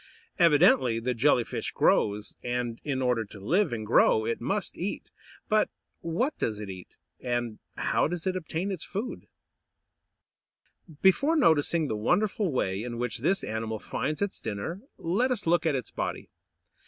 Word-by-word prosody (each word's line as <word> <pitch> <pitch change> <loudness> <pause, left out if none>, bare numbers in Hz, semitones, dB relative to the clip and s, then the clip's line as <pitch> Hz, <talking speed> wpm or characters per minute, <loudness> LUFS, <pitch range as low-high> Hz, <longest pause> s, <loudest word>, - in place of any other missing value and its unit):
Evidently 145 -8 +5
the 125 +2 -1
Jelly 125 +1 +3
fish - - -4
grows, 105 0 +1
and, 120 -1 -2
in 135 -3 -1
order 125 -3 +2
to 100 -1 -12
live 175 - +1
and 110 -2 -3
grow, 110 0 +4
it 115 - -2
must 195 - -2
eat; 185 +4 -4 0.4
but 215 -1 +3 0.3
what 185 - -1
does 105 -2 -1
it 105 -2 -5
eat, 95 -1 -11 0.2
and 120 -3 -2 0.2
how - - +1
does 175 +1 -4
it 185 -1 0
obtain 180 +2 -3
its 185 - -4
food? 220 +6 -5
[Illustration: - - -51 0.3
MEDUSA.] - - -32
Before 275 - +4
noticing 160 - +3
the 110 - -2
wonderful 185 - +1
way 95 -7 -1
in 120 0 -5
which 120 -2 -2
this 190 +10 +1
animal 110 0 -3
finds 155 - -2
its 200 - -4
dinner, 110 - -4 0.2
let 200 +10 +1
us 245 -5 -1
look 170 0 +3
at 150 - +2
its 130 - -4
body. - - -4
145 Hz, 165 wpm, -28 LUFS, 115-185 Hz, 0.4 s, Evidently